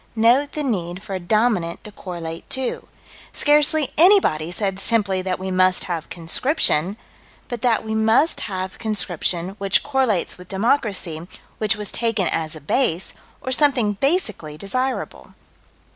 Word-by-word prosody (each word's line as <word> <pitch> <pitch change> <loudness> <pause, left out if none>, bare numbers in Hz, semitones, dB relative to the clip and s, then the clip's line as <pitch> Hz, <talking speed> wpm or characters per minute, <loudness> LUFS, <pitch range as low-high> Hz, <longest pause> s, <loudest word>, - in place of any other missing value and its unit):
Note 240 +6 +3
the 300 - -2
need 185 -7 -3
for 200 - -7
a 190 - -2
dominant 185 -2 0
to 210 - -9
correlate 170 -4 -7
to. 260 -1 -2 0.5
Scarcely 300 0 +3
anybody 320 - +5
said 195 0 -1
simply 200 -3 +2
that 185 0 -2
we 190 0 -5
must 185 0 +3
have 170 -4 -4
conscription: 180 - +1 0.5
but 240 -2 -5
that 230 -3 +1
we 220 - -3
must 220 +8 +3
have 185 -1 -5
conscription, 185 -5 -1
which 195 0 +2
correlates 260 -12 0
with 180 - -12
democracy, 195 - 0 0.3
which 215 0 +1
was 210 -2 -5
taken 225 -5 0
as 160 -1 -2
a 155 - -10
base, 180 - 0 0.3
or 260 - -4
something 255 -6 +3
basically 215 - -1
desirable. 255 +9 -3
205 Hz, 145 wpm, -21 LUFS, 180-250 Hz, 0.5 s, anybody